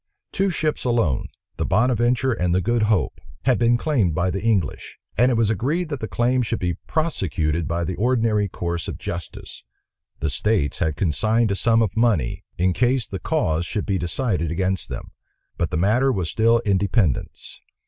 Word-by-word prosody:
Two 195 0 +1
ships 155 -3 -1
alone, 115 - +1 0.3
the - - -1
Bonaventure 120 +4 +2
and 90 -6 0
the 95 - +2
Good 120 +5 +1
Hope, 105 -5 0 0.2
had 130 -2 +2
been 120 0 +4
claimed 115 - +1
by 90 +3 +1
the 95 - -3
English; 105 -8 -1 0.2
and 125 +4 +4
it 125 - +2
was 115 -2 +2
agreed 150 - -1
that 145 -3 -3
the 110 - -4
claim 125 +3 +1
should 115 - -1
be 90 -1 -1
prosecuted 85 - -1
by 85 +1 -1
the 90 +1 -3
ordinary 115 -3 +2
course 85 -2 -4
of - - -5
justice. 85 -2 -7 0.6
The 80 - -1
states 100 -1 0
had 80 -2 0
consigned 110 +7 +1
a - - +1
sum 115 +2 +3
of 95 -4 -2
money, 110 - +1
in 90 +1 +2
case 125 +1 +1
the 95 - -5
cause 85 - 0
should 105 - -3
be 95 -2 0
decided 90 - -1
against 95 +2 -1
them; - - -7 0.4
but - - -1
the - - -2
matter 115 +10 +3
was 95 -8 -2
still 115 +1 +4
in 100 -2 +3
dependence. 95 - -1
105 Hz, 185 wpm, -22 LUFS, 90-120 Hz, 0.6 s, been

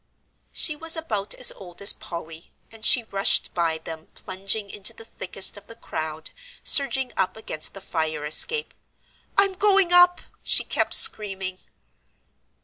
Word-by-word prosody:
She 305 - +1
was 325 +2 +1
about 215 -11 -4
as 250 - +4
old 180 -3 -13
as 200 - +7
Polly, 165 0 -9 0.2
and 225 -1 -13
she 240 +2 +5
rushed 200 -3 +1
by 165 -2 -1
them 160 0 -10
plunging 195 +3 -4
into 205 -1 -4
the 225 - -13
thickest 190 -2 -1
of 205 - -15
the 230 - -10
crowd 155 -7 -6 0.3
surging 275 -3 +1
up 190 +3 -2
against 155 -7 -4
the 195 - -10
fire 160 -5 -4
escape. 450 - +1 0.6
"I'm 395 -1 +3
going 390 -2 +2
up," 355 0 +5 0.2
she - - +3
kept - - +2
screaming. 190 -3 +3
200 Hz, 145 wpm, -23 LUFS, 170-280 Hz, 0.6 s, as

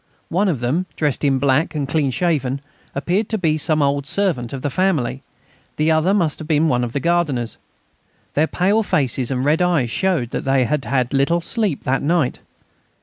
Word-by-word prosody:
One 195 +5 +1
of 150 -10 -1
them, 155 +10 0
dressed 150 -2 0
in 135 -2 +3
black 140 +4 +1
and 145 -2 -1
clean 145 -1 +1
shaven, 140 -3 0 0.4
appeared 180 +9 0
to 220 - 0
be 160 -6 +1
some 155 -1 +2
old 140 0 0
servant 165 -14 -1
of 135 -2 -6
the 145 - -1
family, 140 -8 0 0.5
the 155 +1 +2
other 160 +4 +3
must 175 -7 +1
have 155 - -7
been 155 0 +3
one 125 -5 +1
of 120 -1 -4
the 140 - 0
gardeners. 145 -7 0 0.8
Their 155 +2 +2
pale 200 +7 +2
faces 130 - 0
and 130 -1 -1
red 155 +4 +2
eyes 165 -10 +1
showed 170 -10 0
that - - -3
they 135 -2 +2
had 150 +1 -1
had 130 -1 0
little 140 +5 +2
sleep 190 - -2
that 135 +1 0
night. 155 -3 +1
150 Hz, 195 wpm, -20 LUFS, 135-170 Hz, 0.8 s, in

